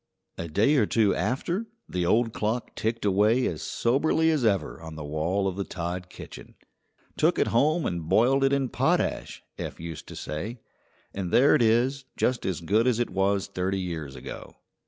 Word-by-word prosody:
A 85 - -3
day 110 - +3
or 110 -6 +3
two 110 -4 +3
after 170 - -1 0.2
the 90 -1 -1
old 115 +3 +2
clock 110 +3 -2
ticked 110 0 -2
away 105 +6 +3
as - - -2
soberly 155 +6 +1
as 150 -5 0
ever 100 -6 0
on 80 -1 -8
the 80 - -6
wall 80 +7 -1
of 95 -1 -3
the 100 - -1
Todd 90 0 -5
kitchen. - - -11 0.6
"Took - - +3
it - - +2
home 155 +7 +2
and 85 -2 -3
boiled 135 +4 +4
it 135 - +3
in 140 -2 +1
potash," - - 0 0.2
Eph - - -5
used 80 -1 -7
to - - -9
say; 105 +11 -5 0.5
"and 95 -2 -3
there 135 +4 +5
it - - +4
is, 125 +4 +2
just 125 -1 0
as 90 -3 -2
good 105 +8 +2
as 125 -3 +2
it 120 - -1
was 100 +1 +1
thirty 95 +1 -2
years 80 -7 -5
ago." 65 - -9
105 Hz, 185 wpm, -26 LUFS, 90-125 Hz, 0.6 s, there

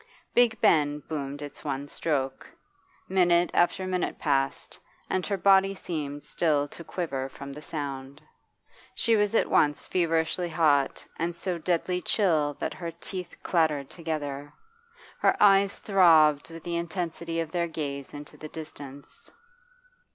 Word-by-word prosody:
Big 235 -3 +4
Ben 145 -2 +4
boomed 145 -2 -4
its 145 - -9
one 140 -1 -3
stroke. 135 -4 -2 0.6
Minute 175 -2 +3
after 175 +2 +2
minute 185 -1 -1
passed, 135 -3 -1 0.3
and 185 -1 0
her 200 - 0
body 195 +1 +4
seemed 145 -6 -5
still 150 -3 +1
to 170 - -10
quiver 140 -7 -3
from 140 +1 -9
the 150 - -9
sound. 140 -3 -5 0.8
She 230 -2 +3
was 210 0 +2
at - - +3
once 145 -1 +2
feverishly 165 0 0
hot 150 -4 +2
and 170 +1 -1
so 175 0 -2
deadly 180 +2 0
chill 160 -8 +2
that - - -3
her 170 -2 -5
teeth 175 +2 -7
clattered 155 -5 +1
together; 145 -4 -4 0.7
her - - +3
eyes 200 -1 +5
throbbed 160 -7 +5
with 165 -1 -10
the 170 -1 -2
intensity 170 -1 -3
of 165 -1 -3
their 170 0 0
gaze 140 -4 -5
into 145 0 -10
the 155 - -8
distance. 145 -3 -10
160 Hz, 140 wpm, -27 LUFS, 145-180 Hz, 0.8 s, eyes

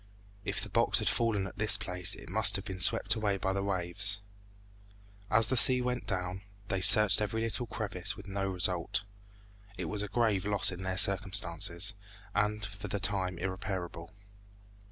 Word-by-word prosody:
If - - -4
the - - -7
box - - +2
had - - 0
fallen 110 -4 0
at 95 - -10
this 105 0 +5
place 90 -4 -2
it - - -13
must 100 +2 +3
have 95 0 -4
been 95 -1 -7
swept - - +4
away 105 -3 -1
by 95 0 -2
the 100 - -2
waves. 100 +1 +1 1.1
As 110 +1 +3
the 130 - -1
sea 125 +1 +9
went 125 0 -4
down, 90 -1 -4 0.3
they 95 -3 -2
searched 105 +1 +5
every 105 +2 -2
little 115 +2 -3
crevice 100 -3 -3
with 100 - -11
no 95 0 -3
result. 90 0 -1 0.7
It - - -5
was 105 -1 -4
a 105 - -4
grave 110 -4 0
loss 100 -2 +2
in 90 0 -8
their 95 0 -4
circumstances, 95 -2 +1 0.4
and 105 0 -1
for 100 +1 -9
the 100 +1 -4
time 95 -2 -2
irreparable. 95 -2 -6
100 Hz, 175 wpm, -30 LUFS, 95-105 Hz, 1.1 s, sea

